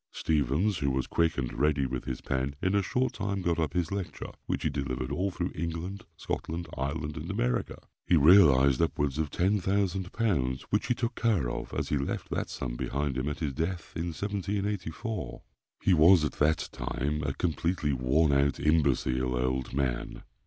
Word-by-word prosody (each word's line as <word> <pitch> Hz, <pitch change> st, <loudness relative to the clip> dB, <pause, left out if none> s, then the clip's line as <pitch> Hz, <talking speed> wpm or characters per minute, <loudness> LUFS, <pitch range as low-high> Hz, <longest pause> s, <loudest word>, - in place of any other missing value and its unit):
Stephens, 80 Hz, -, +1 dB
who 70 Hz, -2 st, +1 dB
was 65 Hz, -1 st, 0 dB
quick 85 Hz, -1 st, +1 dB
and 65 Hz, -3 st, -2 dB
ready 75 Hz, 0 st, +2 dB
with 65 Hz, -1 st, -4 dB
his 65 Hz, -, -4 dB
pen, 65 Hz, +2 st, -2 dB
in 95 Hz, -, 0 dB
a 100 Hz, -, +3 dB
short 125 Hz, +7 st, 0 dB
time 100 Hz, -2 st, -2 dB
got 85 Hz, -1 st, +1 dB
up 75 Hz, -3 st, 0 dB
his 90 Hz, -1 st, -1 dB
lecture, 100 Hz, -2 st, -4 dB, 0.2 s
which -, -, -1 dB
he -, -, +2 dB
delivered 65 Hz, -2 st, -3 dB
all 90 Hz, +7 st, 0 dB
through 90 Hz, -1 st, -3 dB
England, 85 Hz, +6 st, -4 dB
Scotland, 85 Hz, +2 st, -4 dB
Ireland, 70 Hz, +3 st, -3 dB
and 75 Hz, -, -6 dB
America. -, -, -1 dB, 0.3 s
He 90 Hz, -, +5 dB
realised 70 Hz, -5 st, +6 dB
upwards 75 Hz, -3 st, 0 dB
of 80 Hz, -2 st, 0 dB
10,000 95 Hz, 0 st, 0 dB
pounds, 65 Hz, -, 0 dB
which -, -, +1 dB
he 125 Hz, -, +2 dB
took 120 Hz, 0 st, -2 dB
care 100 Hz, -, +1 dB
of, -, -, -5 dB
as -, -, -2 dB
he 75 Hz, -, +1 dB
left 70 Hz, -, -3 dB
that -, -, -2 dB
sum -, -, -4 dB
behind 70 Hz, +1 st, -2 dB
him 65 Hz, +3 st, -1 dB
at 75 Hz, -, -5 dB
his 75 Hz, -4 st, -1 dB
death, 85 Hz, +3 st, -3 dB
in 85 Hz, +1 st, -2 dB
1784. 100 Hz, +2 st, -3 dB, 0.4 s
He 95 Hz, -, +4 dB
was 85 Hz, 0 st, +6 dB
at 75 Hz, -, -1 dB
the 75 Hz, +2 st, +2 dB, 0.2 s
time, 75 Hz, +5 st, -2 dB
a 70 Hz, -2 st, -2 dB
completely 85 Hz, -3 st, 0 dB
worn 70 Hz, +5 st, +2 dB
out, 70 Hz, 0 st, +2 dB
imbecile 65 Hz, -4 st, +2 dB
old 65 Hz, +1 st, -1 dB
man. 65 Hz, -3 st, -2 dB
75 Hz, 180 wpm, -29 LUFS, 70-90 Hz, 0.4 s, realised